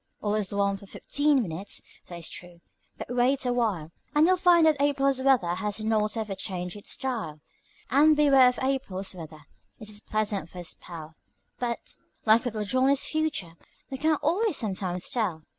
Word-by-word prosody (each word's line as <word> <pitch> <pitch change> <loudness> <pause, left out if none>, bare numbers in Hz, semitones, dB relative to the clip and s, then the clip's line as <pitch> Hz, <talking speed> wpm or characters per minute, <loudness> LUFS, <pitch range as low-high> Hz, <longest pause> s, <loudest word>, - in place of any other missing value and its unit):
All 205 -1 -1
is 210 -3 0
warmth 200 -1 0
for 200 - -13
fifteen 285 +4 +1
minutes, 180 +2 -3 0.3
that 175 - -8
is 165 - -3
true; 175 -1 -9 0.4
but - - -6
wait 255 +2 +2
awhile, 220 -10 0 0.2
And 300 +2 +6
you'll 370 +2 +5
find 350 -2 +5
that 305 -3 +3
April's 275 -2 +2
weather 250 -11 +3
has 205 +3 -2
not 215 0 +1
ever 215 -3 -2
changed 180 -2 -4
its 205 - -8
style; 230 - -4 0.5
And 300 +4 +6
beware 275 -3 +6
of 250 - -5
April's 230 -9 -1
weather, 155 -3 -10 0.3
it 215 -2 -8
is 205 - -5
pleasant 210 -6 -1
for 180 - -13
a 175 - -5
spell, 165 -1 -7 0.5
But, 240 -1 -3 0.3
like 225 +2 +5
little 215 -3 -2
Johnny's 260 +5 +2
future, 305 - -2 0.4
you 265 - -4
can't 310 0 +2
always 360 +4 +1
sometimes 185 -4 -2
tell. 190 -10 -2
220 Hz, 175 wpm, -27 LUFS, 185-275 Hz, 0.5 s, And